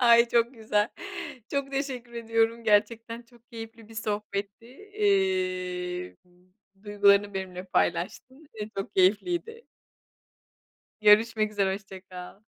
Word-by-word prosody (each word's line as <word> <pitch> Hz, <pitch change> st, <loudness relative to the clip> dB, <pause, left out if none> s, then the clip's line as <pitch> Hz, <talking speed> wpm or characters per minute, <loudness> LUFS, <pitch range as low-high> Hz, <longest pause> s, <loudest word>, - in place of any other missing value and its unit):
Ay, 235 Hz, -1 st, +6 dB
çok 235 Hz, +2 st, +2 dB
güzel. 215 Hz, -2 st, +1 dB, 0.6 s
Çok 280 Hz, -1 st, -2 dB
teşekkür 260 Hz, -3 st, -3 dB
ediyorum, 230 Hz, 0 st, 0 dB
gerçekten 225 Hz, +2 st, +1 dB
çok 235 Hz, 0 st, -24 dB
keyifli 225 Hz, -1 st, -9 dB
bir 225 Hz, -, -13 dB
sohbetti, 210 Hz, -1 st, -4 dB
eee 185 Hz, -, -1 dB, 0.7 s
,duygularını 205 Hz, -1 st, +3 dB
benimle 185 Hz, -1 st, -5 dB
paylaştın 225 Hz, -, -1 dB
ve 215 Hz, -1 st, -5 dB
çok 195 Hz, -, -5 dB
keyifliydi. 345 Hz, -, +1 dB, 1.4 s
Görüşmek 215 Hz, +1 st, +5 dB
üzere, 195 Hz, -2 st, +1 dB
hoşça 195 Hz, -2 st, -8 dB
kal. 185 Hz, +2 st, -11 dB
215 Hz, 105 wpm, -27 LUFS, 195-235 Hz, 1.4 s, Ay